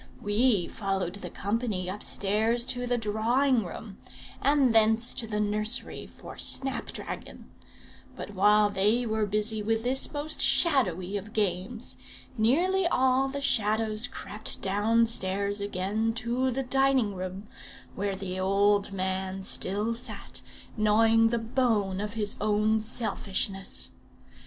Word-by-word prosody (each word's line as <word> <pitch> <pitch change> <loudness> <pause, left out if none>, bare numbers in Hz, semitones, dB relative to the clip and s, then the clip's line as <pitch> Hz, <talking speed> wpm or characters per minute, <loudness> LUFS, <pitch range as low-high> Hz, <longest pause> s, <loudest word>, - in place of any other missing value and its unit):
We 205 -3 +2
followed 195 -4 -3
the - - -6
company 205 -3 -2
upstairs 210 +4 0
to 245 -1 -3
the 245 0 +1
drawing 230 +4 +1
room, 195 +3 -9 0.4
and 280 -4 +3
thence 225 +1 +4
to 225 - -3
the 210 -1 -2
nursery 210 +3 +2
for - - -12
snap 270 -1 +1
dragon; - - -8 0.6
but - - -7
while 205 +1 +4
they 210 +5 +2
were 220 -2 -1
busy 210 +1 0
with 225 +1 -1
this 260 +2 +1
most 300 +1 -4
shadowy 205 - +2
of 210 +2 -9
games, 205 +3 -2 0.4
nearly 345 +12 +2
all 260 -3 +2
the 280 +1 -5
Shadows 220 -3 +1
crept 210 +1 -5
downstairs 205 -1 +1
again 205 +3 -2
to 240 +3 -1
the 265 +2 -2
dining 265 -4 +2
room, 185 +2 -6 0.5
where 200 0 -2
the 185 -1 -5
old 200 +1 +2
man 190 0 -3
still 205 +4 0
sat, 235 +2 -4 0.3
gnawing 225 +1 +4
the 235 +1 0
bone 225 -5 0
of 210 0 -4
his 210 -2 -2
own 215 +1 +2
selfishness. 200 -3 -1
215 Hz, 130 wpm, -27 LUFS, 200-240 Hz, 0.6 s, thence